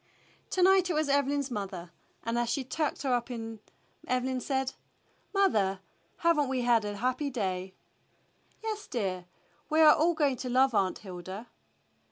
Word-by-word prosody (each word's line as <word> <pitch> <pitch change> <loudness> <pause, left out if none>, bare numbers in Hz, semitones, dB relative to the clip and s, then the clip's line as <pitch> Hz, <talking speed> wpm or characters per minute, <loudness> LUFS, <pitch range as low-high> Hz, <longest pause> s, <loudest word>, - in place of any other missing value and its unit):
To 370 - +1
night 380 -1 +5
it 340 - 0
was 305 -1 +1
Evelyn's 280 -1 +1
mother, 190 -5 -5 0.3
and 230 +1 -1
as 240 -1 0
she 265 +3 0
tucked 300 +4 -2
her 265 -2 +1
up 240 +1 0 0.8
Evelyn 255 +1 0
said, 265 0 -1 0.6
"Mother, 210 - +2 0.4
have 335 -2 +3
n't 285 -3 +1
we 260 -1 0
had 240 -2 +3
a 205 0 -4
happy 255 +6 0
day?" 190 -6 -3 0.9
"Yes, 430 -2 -4
dear. 190 -8 -2 0.4
We 310 - +2
are 305 -1 +9
all 335 +2 +2
going 285 -5 +2
to 250 - -4
love 260 +1 +4
Aunt 190 -3 +1
Hilda." 190 +3 -8
255 Hz, 160 wpm, -30 LUFS, 205-295 Hz, 0.9 s, are